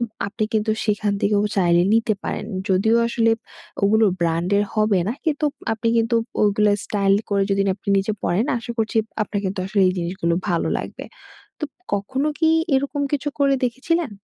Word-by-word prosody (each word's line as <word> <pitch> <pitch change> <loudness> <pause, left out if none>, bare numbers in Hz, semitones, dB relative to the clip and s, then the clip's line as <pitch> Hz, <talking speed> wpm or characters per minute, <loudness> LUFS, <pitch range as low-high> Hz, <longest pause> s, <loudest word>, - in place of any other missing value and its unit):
উম 235 - -1 0.2
আপনি 215 +2 -2
কিন্তু 215 0 +1
সেইখান 210 -1 0
থেকেও 205 0 +2
চাইলে 175 -2 +4
নিতে 225 -1 +2
পারেন। - - -3 0.2
যদিও 200 +5 +3
আসলে 230 -1 +2 0.5
ওগুলো 220 +2 +4
ব্র্যান্ডের 175 +5 +1
হবে 215 -3 +2
না, 225 - 0
কিন্তু 300 -1 +1 0.3
আপনি 230 +1 -1
কিন্তু 230 +1 +2 0.3
ওইগুলো 210 0 +3
স্টাইল 200 -1 +2 0.2
করে 200 -1 +2
যদি 195 0 +2
না - - +2
আপনি 205 - -12
নিজে 200 +3 -1
পড়েন, 205 +8 +1
আশা 235 - -8
করছি 220 0 -1 0.3
আপনার 205 -1 -3
কিন্তু 190 0 -2
আসলে 200 0 +1
এই 185 - +1
জিনিসগুলো 170 -1 -1
ভালো 170 -2 0
লাগবে। - - -7 0.6
তো - - -1 0.3
কখনো 260 +9 -1
কি 320 -1 +3 0.3
এইরকম 280 +2 0
কিছু 290 +1 0
করে 275 -1 +3
দেখেছিলেন? 280 +5 -1
210 Hz, 175 wpm, -22 LUFS, 195-235 Hz, 0.6 s, চাইলে